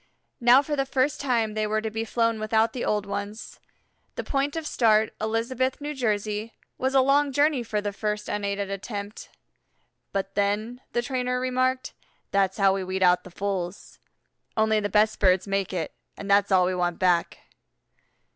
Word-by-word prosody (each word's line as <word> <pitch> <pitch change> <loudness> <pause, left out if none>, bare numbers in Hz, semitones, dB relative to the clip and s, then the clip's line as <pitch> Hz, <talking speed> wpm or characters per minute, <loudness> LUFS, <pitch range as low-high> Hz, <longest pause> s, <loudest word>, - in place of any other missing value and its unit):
Now 250 +3 +6
for 295 0 -2
the 275 -1 -1
first 265 +2 0
time 235 -6 0
they 215 0 -1
were 215 +1 0
to 220 0 -4
be 225 +1 -2
flown 230 -1 0
without 220 +1 +1
the 250 - -4
old 210 -1 0
ones. 205 +2 -6 0.6
The - - -3
point 280 +1 -1
of 325 -1 -3
start, 220 -6 +3
Elizabeth, 235 +4 -1
N. 295 +1 -4
J., 215 -3 -2 0.3
was 265 +1 0
a 265 - +7
long 280 +2 +3
journey 285 0 +2
for 215 -2 -2
their 205 0 -2
first 210 0 -3
unaided 200 -1 -2
attempt. 200 +1 -6 0.8
"But 195 0 -3
then," 210 +5 -1
the 240 - 0
trainer 250 -1 -1
remarked, 255 0 0 0.4
"that's 195 -1 +1
how 195 -2 +4
we 195 -1 -2
weed 190 +1 -2
out 180 0 +4
the - - -11
fools; 190 -1 -4 0.6
only 220 0 +3
the 205 -1 -2
best 215 +2 +2
birds 185 -1 +3
make 195 -1 -1
it, 175 -4 -3 0.2
and 200 - -7
that's 200 0 +3
all 185 -1 +5
we 185 - 0
want 175 -1 -1
back." 175 -2 +1
215 Hz, 175 wpm, -26 LUFS, 200-250 Hz, 0.8 s, a